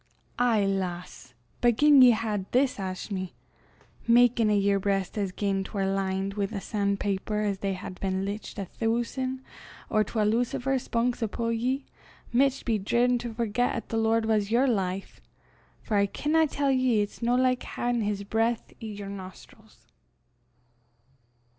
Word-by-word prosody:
"Ay, 230 -5 +3
lass! 180 -8 -4 0.3
but 240 -2 +4
gien 290 -2 +7
ye 250 - +9
hed 215 -4 0
this 255 +1 +2
ashmy, 185 0 -4 0.7
makin' 235 -1 +5
a' 210 - +3
yer 200 0 +2
breist 195 -1 -1
as 200 -3 -1
gien 195 0 -1
'twar 195 0 -3
lined 195 0 -1
wi' 200 -1 -1
the 205 0 -5
san' 200 0 -1
paper 205 +2 -2
'at 200 -2 -2
they 195 -1 -1
hed 185 0 -8
been 190 0 -1
lichtin' 200 0 -5
a - - -7
thoosan' 240 +5 -2 0.5
or 215 -1 +3
twa 220 0 -2
lucifer 245 +5 +1
spunks 240 0 -1
upo' 230 +1 -2
ye 250 +4 -1 0.5
micht 270 +2 +2
be 225 -3 +1
driven 240 +5 +2
to 235 0 -5
forget 230 +1 0
'at 230 - -6
the 225 - -1
Lord 225 0 +2
was 215 -2 +1
yer 240 +4 +3
life 195 -6 -2 0.6
for 215 - -2
I 200 0 +3
can 315 +8 +1
tell 280 -1 0
ye 255 -5 +2
it's 205 - -9
no 240 +1 +2
like 255 0 +2
haein 240 -1 -2
his 205 -1 -2
breith 225 +3 -1
i' - - -6
yer 205 -2 -6
nostrils." 190 -2 -11
215 Hz, 160 wpm, -27 LUFS, 195-240 Hz, 0.7 s, ye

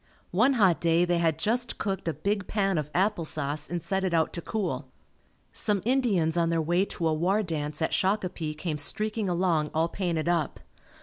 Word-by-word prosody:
One 225 +10 +4
hot 195 -9 +3
day 170 +1 +3
they 175 -1 +1
had 165 -2 +2
just 235 +7 0
cooked 195 -4 -3
a 165 - +1
big 200 -1 -1
pan 195 -5 +1
of 150 -1 -4
apple 190 0 +1
sauce 150 -1 -3
and 175 -2 -3
set 190 +2 -1
it 185 -3 +1
out 160 -1 +1
to 170 - -4
cool. 215 +3 -3 0.7
Some 205 -4 +1
Indians 215 -11 +2
on 170 -1 +2
their 165 0 +1
way 175 +4 +2
to 170 -4 -2
a 160 - +2
war 185 +7 +1
dance 155 -3 -3
at - - 0
Shakopee 185 -5 0
came 155 -2 -3
streaking 215 +5 -1
along 170 -4 +1
all 165 +1 +2
painted 170 -4 -2
up. 170 -4 0
175 Hz, 195 wpm, -27 LUFS, 160-200 Hz, 0.7 s, One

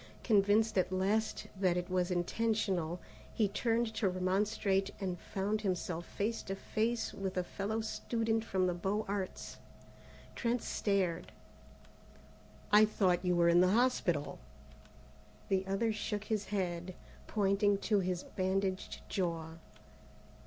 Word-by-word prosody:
Convinced 215 0 +3
at 185 - 0
last 200 +4 0
that 185 -2 +2
it 175 0 -2
was 180 -1 0
intentional, 180 -2 0 0.4
he 215 - +3
turned 225 +2 0
to 215 -3 +1
remonstrate 195 +1 +1
and 185 -3 -3
found 205 +2 -2
himself 180 -4 -2
face 225 +3 -2
to 195 - -4
face 225 +4 -1
with 190 -1 -4
a 180 - +2
fellow 205 +5 -3
student 225 0 -1
from 190 -4 0
the 180 - +1
Beaux 195 +5 -1
Arts. 195 -2 -4 0.8
Trent 240 -1 -1
stared. 190 -5 0 1.4
"I 210 +1 +8
thought 190 -4 +2
you 180 -1 +2
were 170 0 +4
in 170 +1 +6
the 185 +1 +4
hospital!" 180 - +1 1.1
The 190 0 +1
other 215 +3 +1
shook 210 -1 -3
his 215 -2 -1
head, 180 -2 -3 0.3
pointing 200 -1 +2
to 210 -2 +2
his 180 -1 -1
bandaged 190 0 -2
jaw. 165 -3 -2
195 Hz, 130 wpm, -33 LUFS, 180-215 Hz, 1.4 s, I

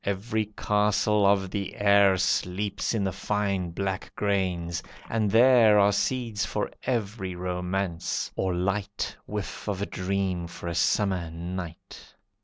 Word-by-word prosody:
Every 105 +2 -1
castle 105 0 +2
of 95 -2 +2
the 100 -2 -3
air 100 -1 +5
Sleeps 95 +3 0
in 105 - 0
the 95 - 0
fine 100 -1 -1
black 95 +2 -3
grains, 90 -4 -1 0.3
and 110 -2 0
there 115 -1 +6
Are 100 0 +5
seeds 110 0 -1
for - - -2
every 105 -6 -2
romance, 90 0 -2
or 95 - 0
light 100 +3 -2
Whiff 105 0 -5
of 100 -2 -2
a 100 - -1
dream 95 -2 -2
for 85 0 -8
a 85 - -2
summer 90 0 +1
night. 85 0 -8
100 Hz, 135 wpm, -27 LUFS, 90-105 Hz, 0.3 s, there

